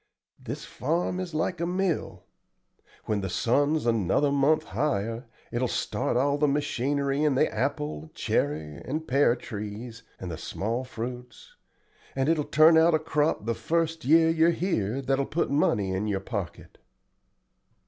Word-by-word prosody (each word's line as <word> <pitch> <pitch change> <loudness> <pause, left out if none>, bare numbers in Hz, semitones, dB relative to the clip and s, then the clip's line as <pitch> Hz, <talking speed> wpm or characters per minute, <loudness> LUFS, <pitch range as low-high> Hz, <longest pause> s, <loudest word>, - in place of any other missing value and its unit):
This - - -6
farm 170 +6 -1
is 180 -4 -5
like 170 +2 -1
a 170 - 0
mill. 180 -1 -2 0.8
When 105 -2 -1
the 95 - -3
sun's 145 - +1
another 115 +5 +2
month 140 +3 +3
higher 115 - -2 0.2
it 120 - -2
will 130 - +2
start 120 - -1
all 140 +3 +1
the 150 - +3
machinery 140 0 0
in 150 -3 +2
the - - +3
apple, 75 +1 -2
cherry, 75 +1 -1
and 160 +2 -4
pear 135 -2 +3
trees 110 +1 -7 0.2
and 90 -2 -5
the 80 - -6
small 115 +5 -3
fruits, 125 0 -8 0.6
and 135 0 0
it 165 - +3
will 150 - -1
turn 160 +2 +6
out 165 0 +5
a - - +2
crop 155 -6 0
the 115 - 0
first 165 +3 -1
year 160 +4 +5
you're 165 +1 +4
here 135 - -1
that 135 +1 +1
will 140 - +1
put 165 - -1
money 105 -9 +2
in 95 +3 -1
your 100 -2 0
pocket." 100 -4 -6
135 Hz, 160 wpm, -27 LUFS, 110-155 Hz, 0.8 s, turn